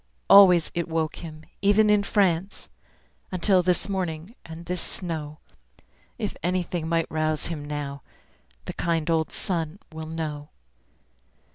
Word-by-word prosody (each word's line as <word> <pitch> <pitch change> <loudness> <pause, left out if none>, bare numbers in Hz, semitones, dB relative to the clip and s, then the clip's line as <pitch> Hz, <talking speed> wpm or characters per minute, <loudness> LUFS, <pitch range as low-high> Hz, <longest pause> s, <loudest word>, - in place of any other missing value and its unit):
Always 180 -5 +8
it 170 -1 -2
woke 160 -1 -2
him, 155 -2 -9 0.2
even 210 +2 +4
in 210 -1 +4
France, 195 -2 0 0.6
Until 185 +1 +3
this 180 +1 +1
morning, 180 -1 -3
and 165 +1 -10
this 180 0 -2
snow. 155 -4 -2 0.8
If 215 -4 -3
anything 175 -2 -1
might 165 -1 +1
rouse 155 0 0
him 155 -4 -5
now 145 -1 -5 0.6
The - - -5
kind 165 -1 -1
old 160 -1 +1
sun 170 -3 -3
will 160 0 -7
know. 155 -2 -5
165 Hz, 130 wpm, -25 LUFS, 155-185 Hz, 0.8 s, Always